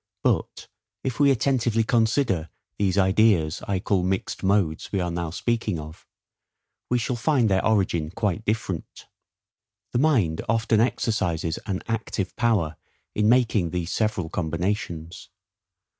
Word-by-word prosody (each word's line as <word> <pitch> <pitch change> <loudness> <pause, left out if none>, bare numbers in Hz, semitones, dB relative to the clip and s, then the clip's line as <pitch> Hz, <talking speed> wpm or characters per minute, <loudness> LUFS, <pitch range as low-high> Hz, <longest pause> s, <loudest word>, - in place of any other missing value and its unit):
But - - 0 0.4
if 130 -1 -3
we 145 -1 +5
attentively 120 -3 +2
consider 110 - +1 0.3
these 100 -2 +1
ideas 95 -5 +3
I 100 - 0
call 95 0 +1
mixed 95 +1 -2
modes, 95 -5 +1
we 100 - 0
are 90 -1 -1
now 85 -1 -3
speaking 110 +1 -1
of, 75 +1 -10 0.8
we 125 - +2
shall 120 +1 -1
find 125 -1 +2
their 95 -1 +2
origin 95 -7 +1
quite 105 +1 -2
different. 105 -5 -3 0.9
The 120 - 0
mind 115 - +2
often 115 -1 +2
exercises 85 -9 0
an 95 -2 -2
ACTIVE 115 -3 -3
power 105 - +1 0.4
in 105 0 +2
making 115 -7 +3
these 90 0 -3
several 105 -6 0
combinations. 85 0 -3
100 Hz, 130 wpm, -25 LUFS, 85-115 Hz, 0.9 s, we